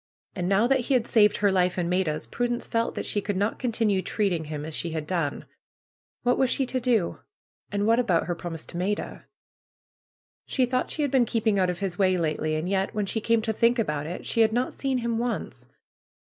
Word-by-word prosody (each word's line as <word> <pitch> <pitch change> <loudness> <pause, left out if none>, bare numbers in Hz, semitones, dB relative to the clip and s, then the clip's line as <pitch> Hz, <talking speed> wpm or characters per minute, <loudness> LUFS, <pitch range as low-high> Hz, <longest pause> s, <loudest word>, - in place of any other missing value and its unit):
And 180 -2 -2
now 200 +3 +4
that 265 +2 +3
he 255 +2 +1
had 240 -2 +2
saved 210 -3 +4
her 205 -1 +3
life 180 -1 +2
and 175 -2 0
Maida's, 175 -4 0
Prudence 245 0 -2
felt 230 0 -1
that - - -3
she 205 - -1
could 200 -1 -2
not 205 +3 0
continue 225 -5 +1
treating 185 -6 -1
him 150 -1 -5
as 160 - -7
she 165 +1 -3
had 155 -2 -3
done. 165 -4 -2 0.8
What 245 0 +2
was 265 - +3
she 270 - +1
to 255 +1 -2
do? 235 -8 +1 0.5
And 205 0 0
what 230 +2 +4
about 190 -9 +2
her 175 - -1
promise 170 -2 -5
to 170 - -8
Maida? 200 +4 -3 1.2
She 260 - +2
thought 255 +1 -1
she 305 - -1
had 285 - 0
been 260 -3 +4
keeping 220 -3 +1
out 185 -1 +2
of 180 +1 -4
his 190 -2 -3
way 185 -1 +3
lately. 155 -1 -1
And 155 +3 -2
yet, 195 +1 -1
when 210 -1 0
she 220 +3 -3
came 230 0 +2
to 220 - -1
think 235 +2 +3
about 150 -9 -1
it 175 - -6
she 230 - +1
had 220 0 +4
not 245 +2 0
seen 270 -2 -1
him 235 -2 -1
once. 240 0 -4
205 Hz, 225 wpm, -26 LUFS, 175-235 Hz, 1.2 s, now